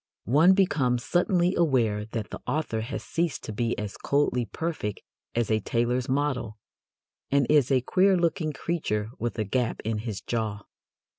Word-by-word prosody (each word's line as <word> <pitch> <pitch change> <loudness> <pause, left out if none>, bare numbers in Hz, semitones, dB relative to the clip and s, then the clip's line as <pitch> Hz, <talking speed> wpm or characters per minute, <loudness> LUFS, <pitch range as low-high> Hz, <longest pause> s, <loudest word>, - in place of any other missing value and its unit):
One 155 - +5
becomes 130 -11 +2
suddenly 180 0 +2
aware 120 - +2
that 110 -1 -5
the - - -7
author 145 -8 -1
has 115 - -5
ceased 170 -2 -2
to 110 - -5
be 115 +2 -1
as 105 -2 -5
coldly 140 -4 +1
perfect 150 - -4 0.3
as 120 -2 0
a 110 - +3
tailor's 120 +4 0
model, 130 -5 -1 0.7
and 140 -1 +3
is 145 -5 +4
a 130 -2 +3
queer 185 +8 +3
looking 170 -2 0
creature 115 -10 -2
with 120 +1 -3
a 110 - +1
gap 115 +3 -1
in 110 -1 -1
his 110 -3 -4
jaw. 110 -3 -3
125 Hz, 160 wpm, -27 LUFS, 110-155 Hz, 0.7 s, One